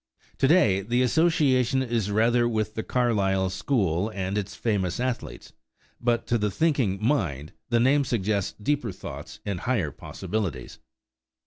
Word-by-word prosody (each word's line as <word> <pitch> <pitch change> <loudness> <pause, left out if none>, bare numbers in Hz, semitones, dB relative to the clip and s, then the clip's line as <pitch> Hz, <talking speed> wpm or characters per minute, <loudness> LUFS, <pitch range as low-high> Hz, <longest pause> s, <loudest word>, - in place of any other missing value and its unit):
To 135 - +4
day 110 - +4
the 120 +5 +1
association 135 -3 +2
is 115 -5 -1
rather 120 +3 +3
with 110 -2 -1
the 110 - -3
Carlisle 100 -7 +1
school 95 - 0
and 95 -2 -3
its 105 -1 -3
famous 100 -5 -1
athletes; 125 -1 -4 0.5
but 120 -1 0
to 120 - +1
the 105 0 +1
thinking 130 - +1
mind 80 - -1 0.2
the 120 -1 +3
name 135 +4 +4
suggests 105 -5 -1
deeper 125 0 -1
thoughts 95 - -9
and 100 -3 -2
higher 100 - -1
possibilities. 85 - -5
110 Hz, 140 wpm, -26 LUFS, 95-125 Hz, 0.5 s, To